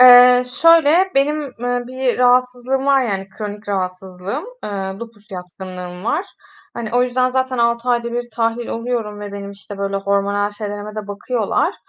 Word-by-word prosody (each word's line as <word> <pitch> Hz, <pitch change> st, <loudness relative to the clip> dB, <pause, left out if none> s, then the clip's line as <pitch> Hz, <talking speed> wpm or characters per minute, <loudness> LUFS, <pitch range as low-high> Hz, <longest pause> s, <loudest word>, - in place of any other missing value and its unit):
Eee, 250 Hz, 0 st, +9 dB, 0.2 s
şöyle, 335 Hz, +3 st, +6 dB
benim, 295 Hz, +2 st, +2 dB, 0.2 s
eee, 245 Hz, 0 st, 0 dB
bir 255 Hz, -1 st, -1 dB
rahatsızlığım 250 Hz, +2 st, +2 dB
var, 275 Hz, -1 st, +5 dB
yani, 195 Hz, -4 st, -2 dB
kronik 205 Hz, +1 st, -7 dB
rahatsızlığım, 190 Hz, -, -3 dB, 0.2 s
eee, -, -, -4 dB, 0.3 s
lupus 225 Hz, -3 st, -11 dB
yatkınlığım 180 Hz, 0 st, -8 dB
var. 315 Hz, -, 0 dB, 0.5 s
Hani, 230 Hz, -2 st, -4 dB
o 245 Hz, -, +5 dB
yüzden, 255 Hz, 0 st, +2 dB
zaten, 260 Hz, -1 st, 0 dB
6 235 Hz, +1 st, +1 dB
ayda 235 Hz, -1 st, +1 dB
1 240 Hz, 0 st, -3 dB
tahlil 230 Hz, 0 st, 0 dB
oluyorum 230 Hz, -3 st, -3 dB
ve 205 Hz, -1 st, -6 dB
benim, 200 Hz, 0 st, -6 dB
işte, 200 Hz, 0 st, -10 dB
böyle 200 Hz, 0 st, -1 dB
hormonal 200 Hz, +1 st, 0 dB
şeylerime 205 Hz, 0 st, -6 dB
de 210 Hz, -1 st, -4 dB
bakıyorlar, 210 Hz, +2 st, 0 dB
235 Hz, 155 wpm, -19 LUFS, 200-250 Hz, 0.5 s, Eee